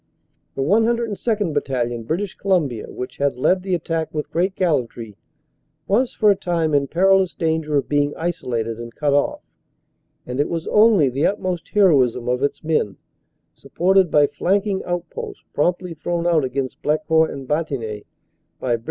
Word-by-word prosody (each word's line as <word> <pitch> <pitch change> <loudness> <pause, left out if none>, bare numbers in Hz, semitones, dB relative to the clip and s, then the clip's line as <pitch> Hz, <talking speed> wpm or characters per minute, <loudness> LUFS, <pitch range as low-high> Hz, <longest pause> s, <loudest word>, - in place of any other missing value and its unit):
The 135 - -1
102nd. 220 - +1
Battalion, 120 -5 -1
British 175 - -2
Colum 185 -6 +1
bia, 120 -4 -7
which 125 - -7
had 140 -3 0
led 185 +8 +2
the 185 -1 -1
attack 165 -1 -3
with 150 -1 -4
great 185 +3 0
gallantry, 125 - -1 0.7
was 235 +6 +2
for 210 -2 +3
a - - +3
time 170 -5 -1
in 140 -1 +2
perilous 190 +2 +3
danger 160 -3 0
of 140 - -1
being 145 0 +1
isolated 120 -9 -3
and 120 0 -8
cut 145 -2 0
off, 145 - +1 0.8
and 125 +2 -5
it 145 - +1
was 165 -1 -3
only 210 -8 +5
the 135 +4 +1
utmost 185 -4 -3
heroism 135 - +3
of 125 +1 0
its 140 +3 -1
men, 155 - 0 0.6
supported 190 +1 +2
by 150 -1 +5
flanking 195 +5 0
outposts 175 -2 -5
promptly 175 +3 0
thrown 170 +2 -3
out 165 -4 +3
against 130 0 -3
Blecourt 155 +1 +2
and 135 -2 -7
Bantigny 130 -9 -3 0.5
by 120 -2 0
Brig. - - -15
160 Hz, 160 wpm, -21 LUFS, 135-185 Hz, 0.8 s, only